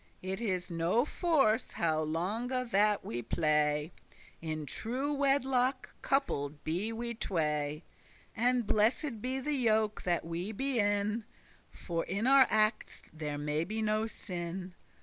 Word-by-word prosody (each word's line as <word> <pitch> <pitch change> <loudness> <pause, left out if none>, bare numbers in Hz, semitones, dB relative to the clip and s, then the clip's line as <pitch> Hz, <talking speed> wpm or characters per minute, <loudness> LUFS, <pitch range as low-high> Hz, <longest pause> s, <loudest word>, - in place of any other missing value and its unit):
It 190 +3 -3
is 185 -5 -2
*no 170 +9 +2
force* 280 - +1
how 155 -2 +1
longe 180 +11 -2 0.2
that 210 0 +3
we 120 +1 -3
play; 150 +3 +1 0.5
*no 165 - -8
matter* 155 0 -2
In - - -6
true 255 - -2
wedlock 270 -2 +1
coupled 150 - -1
be 180 +8 -1
we 235 +1 -3
tway; 150 -7 -1 0.5
And 245 +1 +2
blessed 220 +3 +1
be 260 +2 -2
the 295 +3 -1
yoke 220 -5 +2
that 175 -2 0
we 170 +5 -3
be 265 +2 0
in, 205 +2 +1 0.5
For 170 -2 -4
in 200 +4 -2
our 270 0 +7
actes 215 +1 +1
may - - -17 0.2
there 150 +2 -1
be 220 +2 -2
no 215 +1 +1
sin. 180 -3 -6
210 Hz, 145 wpm, -32 LUFS, 165-245 Hz, 0.5 s, our